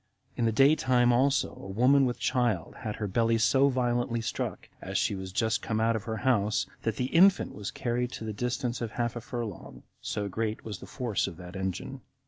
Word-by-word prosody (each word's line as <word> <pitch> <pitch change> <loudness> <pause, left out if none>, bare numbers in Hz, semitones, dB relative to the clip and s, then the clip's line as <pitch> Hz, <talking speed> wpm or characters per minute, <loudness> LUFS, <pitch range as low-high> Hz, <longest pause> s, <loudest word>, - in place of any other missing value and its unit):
In 120 - 0
the 115 - +3
day 135 +7 +5
time 125 -4 +3
also, 135 +3 +2
a - - -10
woman 130 +7 +4
with 120 - -2
child 120 -10 0
had 105 -1 -4
her 105 - -3
belly 115 +3 +2
so 130 +5 +4
violently 120 -2 0
struck, 115 - -4
as - - -3
she - - +1
was 95 -1 -6
just 110 +3 0
come 110 -1 -2
out 115 +1 +2
of 110 -1 -4
her 110 -1 -3
house, 105 -4 +1 0.2
that 115 -2 -1
the 125 +2 -3
infant 190 +3 +5
was 105 -1 -5
carried 125 0 -2
to - - -6
the 110 -1 -4
distance 125 +2 -2
of 115 -2 -4
half 120 -1 -1
a 120 - -4
furlong, 115 -6 -6 0.2
so 105 -1 -3
great 110 +2 -3
was 105 -4 -5
the - - -10
force 120 -5 -1
of 85 - -7
that 90 0 -10
engine. 95 +8 -4
115 Hz, 215 wpm, -29 LUFS, 105-125 Hz, 0.2 s, day